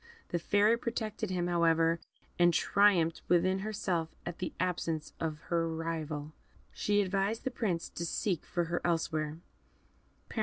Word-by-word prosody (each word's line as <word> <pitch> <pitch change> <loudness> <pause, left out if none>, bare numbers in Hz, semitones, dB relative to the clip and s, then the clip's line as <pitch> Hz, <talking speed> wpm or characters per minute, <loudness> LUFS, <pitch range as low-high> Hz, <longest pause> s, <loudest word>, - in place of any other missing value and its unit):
The 175 - 0
Fairy 205 +6 +4
protected 220 -3 -3
him, 180 -2 0
however, 165 -1 +3 0.4
and 175 -1 +5
triumphed 175 -3 +4
within 185 +2 +3
herself 190 -5 -1 0.2
at 175 -1 -5
the 180 - -2
absence 165 -3 -1
of 155 -2 -2
her 165 -1 +2
rival. 160 -2 -3 0.4
She 205 0 +2
advised 195 +3 0
the 260 - -1
Prince 185 -9 -1
to 170 - -5
seek 180 0 -1
for 175 - -1
her 170 +1 -2
elsewhere. 160 -2 0
175 Hz, 140 wpm, -32 LUFS, 165-195 Hz, 0.4 s, and